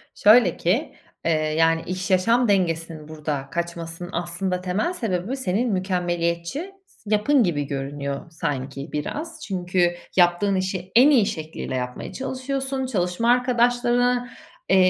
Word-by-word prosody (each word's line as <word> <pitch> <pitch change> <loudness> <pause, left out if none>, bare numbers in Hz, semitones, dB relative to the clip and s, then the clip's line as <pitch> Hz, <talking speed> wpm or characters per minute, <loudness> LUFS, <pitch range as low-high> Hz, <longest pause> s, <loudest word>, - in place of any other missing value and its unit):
Şöyle 210 -4 +5
ki, 220 - 0 0.3
eee, 165 - +3
yani, 160 +1 +2
iş-yaşam 190 +6 +2
dengesinin 165 -5 0
burada 150 -3 -4
kaçmasının 170 +1 -4
aslında 180 +2 -2
temel 190 - -1
sebebi 220 - -2
senin 235 0 0
mükemmeliyetçi 180 - -1 0.3
yapın 215 +6 +3
gibi 145 -6 -1
görünüyor 140 +1 -4
sanki 140 -2 -4
biraz. 295 - -4
Çünkü 180 -2 +1 0.2
yaptığın 175 +2 +3
işi 185 -1 -3
en 260 +5 +8
iyi 245 -8 +5
şekliyle 155 -6 -4
yapmaya 125 -1 -4
çalışıyorsun, 265 0 -3
çalışma 205 0 +1
arkadaşlarına, 245 0 +2 0.4
eee, - - +5
180 Hz, 115 wpm, -23 LUFS, 165-240 Hz, 0.4 s, en